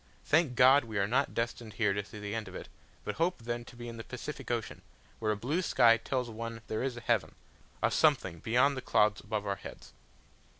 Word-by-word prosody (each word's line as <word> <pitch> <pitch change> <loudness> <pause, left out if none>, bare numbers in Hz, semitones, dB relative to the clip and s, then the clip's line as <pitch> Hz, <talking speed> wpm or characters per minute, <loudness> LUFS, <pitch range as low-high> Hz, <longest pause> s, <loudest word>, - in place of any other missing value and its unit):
Thank 155 -4 +3
God, 130 +2 +6
we 110 -2 -5
are 100 - +3
not 130 +7 0
destined 115 -1 -3
here 100 0 +1
to 100 +1 -2
see 105 - -11
the 105 0 -5
end 115 -1 -3
of - - -10
it, - - -8 0.3
but - - -4
hope 170 -7 +1
then 120 0 -3
to 120 - -13
be 120 0 -8
in 115 -1 -7
the 115 - -6
Pacific 135 +3 -7
Ocean, 120 -2 -3 0.4
where 110 -1 0
a 105 - -1
blue 145 - -1
sky 115 -9 +5
tells 125 +1 -2
one 115 0 -6
there 110 - -3
is 130 -2 -2
a - - -7
heaven, 105 -11 0 0.5
a - - +3
something 85 - +2
beyond 125 - +3
the 130 - -4
clouds 105 -3 +2
above 105 -1 -3
our 100 -1 -1
heads. - - -11
115 Hz, 225 wpm, -31 LUFS, 110-125 Hz, 0.5 s, God